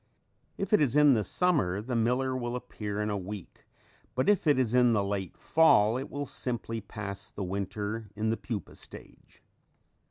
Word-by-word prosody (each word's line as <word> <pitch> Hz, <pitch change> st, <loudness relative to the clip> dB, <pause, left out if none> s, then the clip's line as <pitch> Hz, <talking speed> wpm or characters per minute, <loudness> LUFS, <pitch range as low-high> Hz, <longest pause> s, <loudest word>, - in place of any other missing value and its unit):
If -, -, -3 dB
it 210 Hz, -, +6 dB
is 140 Hz, -3 st, +2 dB
in 150 Hz, -2 st, +7 dB
the 110 Hz, -3 st, +2 dB
summer 120 Hz, -, +1 dB
the 120 Hz, +4 st, -3 dB
miller 125 Hz, +3 st, +1 dB
will 120 Hz, -1 st, -3 dB
appear 105 Hz, -4 st, -4 dB
in 105 Hz, -, -1 dB
a 100 Hz, -, -1 dB
week, 95 Hz, 0 st, -9 dB, 0.5 s
but 130 Hz, -, +1 dB
if 205 Hz, -5 st, +3 dB
it 145 Hz, -, +5 dB
is 125 Hz, -3 st, +1 dB
in 125 Hz, -1 st, +5 dB
the 105 Hz, -2 st, +2 dB
late 100 Hz, -2 st, -3 dB
fall 115 Hz, -9 st, +4 dB
it 130 Hz, +2 st, -4 dB
will 145 Hz, 0 st, -4 dB
simply 115 Hz, -3 st, -4 dB
pass 100 Hz, -1 st, -7 dB
the 100 Hz, -, -6 dB
winter 100 Hz, +3 st, -3 dB
in 110 Hz, +1 st, 0 dB
the 115 Hz, -, 0 dB
pupa 110 Hz, -5 st, -5 dB
stage. -, -, -13 dB
115 Hz, 185 wpm, -29 LUFS, 100-130 Hz, 0.5 s, in